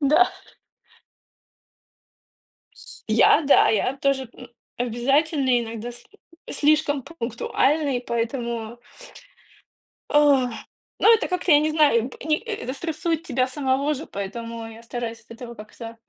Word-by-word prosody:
Да. 305 Hz, +6 st, +4 dB, 2.4 s
С -, -, -13 dB
я, -, -, +5 dB
да, 280 Hz, -, +6 dB
я 240 Hz, +5 st, +1 dB
тоже, 270 Hz, -3 st, 0 dB
м, 250 Hz, -, -13 dB, 0.3 s
обязательный, 260 Hz, +2 st, +1 dB
иногда 230 Hz, +1 st, -6 dB
с 240 Hz, 0 st, -12 dB, 0.5 s
слишком 295 Hz, -2 st, +2 dB
пунктуальный, 275 Hz, 0 st, -1 dB
поэтому 235 Hz, -1 st, -3 dB, 1.3 s
Ах. 280 Hz, -4 st, +4 dB, 0.5 s
Ну, 460 Hz, -, +7 dB
это 450 Hz, -, +1 dB
как-то, 365 Hz, -2 st, -1 dB
я 290 Hz, -, +8 dB
не 310 Hz, +1 st, 0 dB
знаю, 285 Hz, -7 st, +3 dB
б -, -, -13 dB
ни 310 Hz, 0 st, +1 dB
э 460 Hz, 0 st, -6 dB
это 255 Hz, -, -4 dB
стрессует 325 Hz, +1 st, -2 dB
тебя 255 Hz, -6 st, 0 dB
самого 275 Hz, +2 st, 0 dB
же, 295 Hz, +3 st, -7 dB
поэтому 230 Hz, +3 st, -6 dB
я 225 Hz, +1 st, -12 dB
стараюсь 230 Hz, -1 st, -5 dB
от -, -, -21 dB
этого 235 Hz, +1 st, -9 dB
как-то 225 Hz, +1 st, -10 dB
260 Hz, 125 wpm, -23 LUFS, 235-300 Hz, 2.4 s, я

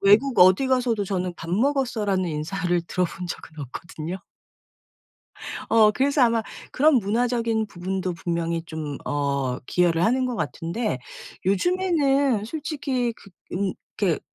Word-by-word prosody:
외국 220 Hz, +6 st, +4 dB
어디 185 Hz, +8 st, +6 dB
가서도 245 Hz, -5 st, +1 dB
저는 180 Hz, -2 st, -2 dB
"밥 165 Hz, -, -7 dB
먹었어."라는 220 Hz, -4 st, +1 dB
인사를 175 Hz, +3 st, -1 dB
들어본 180 Hz, 0 st, -2 dB
적은 160 Hz, -2 st, -8 dB
없거든요. 155 Hz, +5 st, -6 dB, 1.5 s
어 220 Hz, -2 st, +6 dB
그래서 275 Hz, +4 st, +2 dB
아마 230 Hz, -1 st, +3 dB, 0.3 s
그런 305 Hz, +2 st, +4 dB
문화적인 230 Hz, +1 st, +1 dB
부분도 185 Hz, 0 st, -3 dB
분명히 170 Hz, -1 st, -2 dB
좀 155 Hz, -3 st, -5 dB
어 140 Hz, -3 st, -1 dB
기여를 175 Hz, -1 st, +2 dB
하는 255 Hz, +3 st, +2 dB
것 245 Hz, -2 st, -3 dB
같은데 205 Hz, -, -2 dB, 0.5 s
요즘에는 280 Hz, -, +2 dB
솔직히 275 Hz, -3 st, -2 dB
그 200 Hz, -, -17 dB, 0.2 s
음 190 Hz, +1 st, 0 dB, 0.2 s
그렇게 185 Hz, -6 st, +1 dB
200 Hz, 285 characters per minute, -24 LUFS, 175-250 Hz, 1.5 s, 어디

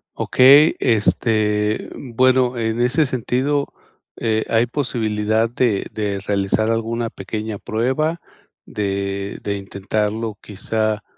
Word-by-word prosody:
Okey, 140 Hz, +5 st, +6 dB
este, 105 Hz, -2 st, +1 dB
bueno, 130 Hz, 0 st, +1 dB
en 115 Hz, +1 st, -1 dB
ese 135 Hz, +5 st, +3 dB
sentido 130 Hz, +3 st, -1 dB, 0.4 s
eh, 110 Hz, -1 st, 0 dB
¿hay 115 Hz, +1 st, +3 dB
posibilidad 110 Hz, -4 st, 0 dB
de 120 Hz, -4 st, 0 dB
de 100 Hz, -2 st, -2 dB
realizar 100 Hz, +2 st, 0 dB
alguna 115 Hz, 0 st, -1 dB
pequeña 105 Hz, +2 st, -5 dB
prueba?, 130 Hz, +11 st, -1 dB, 0.5 s
de 100 Hz, -1 st, -3 dB
de 100 Hz, -1 st, -2 dB
intentarlo 105 Hz, +2 st, -3 dB
quizá, 110 Hz, +1 st, -2 dB
110 Hz, 100 wpm, -20 LUFS, 105-125 Hz, 0.5 s, Okey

